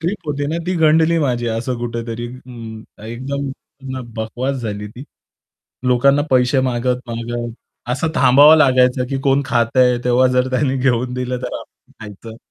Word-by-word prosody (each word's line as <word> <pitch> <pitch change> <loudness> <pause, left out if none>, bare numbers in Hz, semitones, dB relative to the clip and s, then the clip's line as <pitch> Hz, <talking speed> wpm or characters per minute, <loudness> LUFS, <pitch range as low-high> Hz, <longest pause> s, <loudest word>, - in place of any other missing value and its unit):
Trip 175 0 -4
होती 145 -1 -2
ना 165 - -1
ती 185 - 0
गंडली 160 +2 +4
माझी 125 -5 -1
असं 125 +2 -2
कुठेतरी 115 0 -4 0.8
एकदम 140 +3 -4 0.7
बकवास 125 +5 -3
झाली 105 -4 -5
ती. 125 +6 -11 0.8
लोकांना 140 +3 +3
पैसे 130 +1 +3
मागत, 125 +1 -1
मागत 120 0 -4 0.4
असं 160 +6 -1
थांबावं 145 +5 +7
लागायचं, 125 -3 +3
की 135 - -1
कोण 135 0 +3
खातंय 125 +1 +2
तेव्हा 125 +1 +3
जर 125 +1 +2
त्यांनी 130 +1 0
घेऊन 125 -1 0
दिलं 125 0 -3
तर - - -5
आपण - - -18
खायचं. 110 +2 -10
125 Hz, 145 wpm, -18 LUFS, 120-140 Hz, 0.8 s, थांबावं